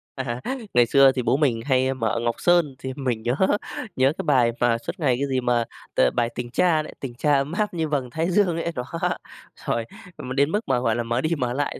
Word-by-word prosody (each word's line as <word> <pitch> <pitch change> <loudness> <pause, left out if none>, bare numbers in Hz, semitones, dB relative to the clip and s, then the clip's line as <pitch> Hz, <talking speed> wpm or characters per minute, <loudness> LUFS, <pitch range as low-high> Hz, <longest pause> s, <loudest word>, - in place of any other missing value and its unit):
À, 125 -2 -4 0.3
ngày 120 -1 +5
xưa 135 +2 +6
thì 130 -1 -2
bố 120 +3 +2
mình 130 -7 +1
hay 130 -1 +2
mở 115 -3 -1
Ngọc 120 0 -1
Sơn 175 -6 +2
thì 130 0 -5
mình 125 -5 -2
nhớ 120 +3 0 0.6
nhớ 130 +2 +3
cái - - -3
bài 130 -6 +3
mà 120 -1 +3
suốt 115 - -7
ngày 130 -6 +2
cái 140 - -1
gì 130 -1 0
mà, 120 -1 +1 0.3
ờ, 65 - +4
bài 120 -1 0
"Tình 120 0 -5
Cha" 165 +2 +3
đấy, - - -9
tình 130 -3 -6
cha 145 +5 +1
ấm 140 +1 +1
áp 210 +3 -1
như 165 -2 -1
vầng 140 -4 -2
thái 160 +7 -1
dương 180 -3 +2
ấy, 170 - -2
đó. 125 - -2 0.8
Rồi, 115 -1 -1 0.3
m 130 - -7
đến 140 +2 +2
mức 210 - +1
mà, 130 -2 +2
gọi 115 -3 +1
là, 120 - -1
mở 120 +2 -1
đi 155 - 0
mở 125 -3 -1
lại 145 +2 -2
130 Hz, 245 wpm, -24 LUFS, 120-145 Hz, 0.8 s, xưa